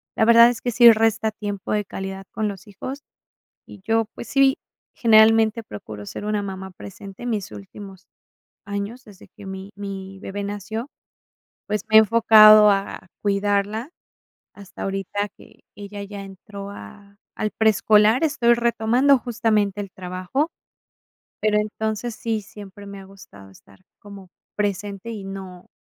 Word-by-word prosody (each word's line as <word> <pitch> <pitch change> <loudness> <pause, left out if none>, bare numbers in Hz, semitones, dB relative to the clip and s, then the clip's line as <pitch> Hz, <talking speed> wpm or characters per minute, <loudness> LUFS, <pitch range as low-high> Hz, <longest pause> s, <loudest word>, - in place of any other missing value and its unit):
la 220 - +3
verdad 235 +1 +8
es 245 - -4
que 245 - -2
sí 235 0 +8
resta 220 0 +1
tiempo 205 -2 -6
de 210 -1 0
calidad 195 0 -7
con 215 +1 -2
los 200 -1 -7
hijos. 255 +8 -7 0.7
Y 200 - -13
yo, 225 0 +1
pues - - -8
sí, 275 0 +3 0.4
generalmente 225 0 +4
procuro 105 - -9
ser 205 - -7
una 210 -1 -1
mamá 190 -1 -6
presente, 195 +2 -11
en 245 - -2
mis 205 - -3
últimos 190 - -11 0.6
años 205 +5 -5
desde 205 -2 -16
que 205 - -14
mi 190 +1 -8
mi 195 -1 -7
bebé 200 +1 -6
nació, 210 +5 -5 0.8
pues 210 -1 -2
me 220 - +2
he - - +12
enfocado 215 -1 +7
a 195 -1 -3
cuidarla 205 +5 -1 0.6
hasta 200 -2 -12
ahorita 195 +1 -3
que - - -19
ella 205 0 -8
ya 200 0 -8
entró 200 +1 -10
a 200 - -13 0.2
al 215 - -2
preescolar, 220 +3 +3
estoy 240 -6 +3
retomando 235 +4 +3
justamente 215 -4 0
el 200 -2 -8
trabajo, 185 - -3 0.9
pero 210 -1 +2
entonces 220 +2 -3
sí, 225 -1 -2
siempre 205 0 -12
me 200 0 -9
ha 195 - -12
gustado 100 - -15
estar 100 0 -20 0.2
como 200 -2 -13 0.3
presente, 200 +1 -3
y 210 -3 -7
no 190 -2 -9
205 Hz, 150 wpm, -22 LUFS, 195-220 Hz, 0.9 s, he